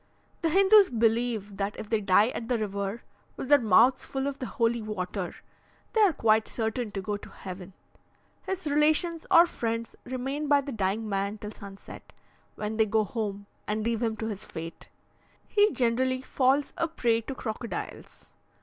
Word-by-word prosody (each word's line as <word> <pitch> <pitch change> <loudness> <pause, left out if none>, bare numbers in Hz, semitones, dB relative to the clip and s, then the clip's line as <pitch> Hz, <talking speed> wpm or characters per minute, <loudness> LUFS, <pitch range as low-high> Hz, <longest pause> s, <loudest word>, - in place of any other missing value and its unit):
The 330 - +1
Hindoos 390 +3 +6
believe 225 -3 0
that 200 +1 -2
if - - -6
they 220 0 0
die 200 +3 +4
at 235 -1 -6
the 245 - +2
river 200 +1 -3 0.3
with 265 - -5
their 290 -1 +7
mouths 230 +3 +4
full 270 0 -3
of 280 -1 -3
the 255 - -4
holy 230 0 0
water, 195 -3 -4 0.6
they 445 - +3
are 405 -4 +6
quite 220 -6 +2
certain 225 0 -2
to 195 - -3
go 205 +1 -2
to - - -12
heaven. 185 0 -9 0.7
His 380 -2 -3
relations 310 +3 +1
or 335 - +8
friends 230 -7 -3
remain 270 +4 -3
by 285 -1 +4
the 280 0 -6
dying 215 0 -1
man 200 +1 -2
till 210 0 -7
sunset, 200 -2 -12 0.4
when 215 +1 -4
they 220 -1 +3
go 220 +1 +2
home, 205 -2 -4 0.2
and 215 +1 -1
leave 230 0 -1
him 225 -2 -1
to 220 - -4
his 210 -3 -4
fate. 165 +1 -8 0.6
He 415 0 +4
generally 255 +1 +1
falls 270 +2 +1
a 330 - +2
prey 235 -8 +1
to 265 +4 -6
crocodiles. 230 -1 -6
230 Hz, 175 wpm, -28 LUFS, 210-270 Hz, 0.7 s, or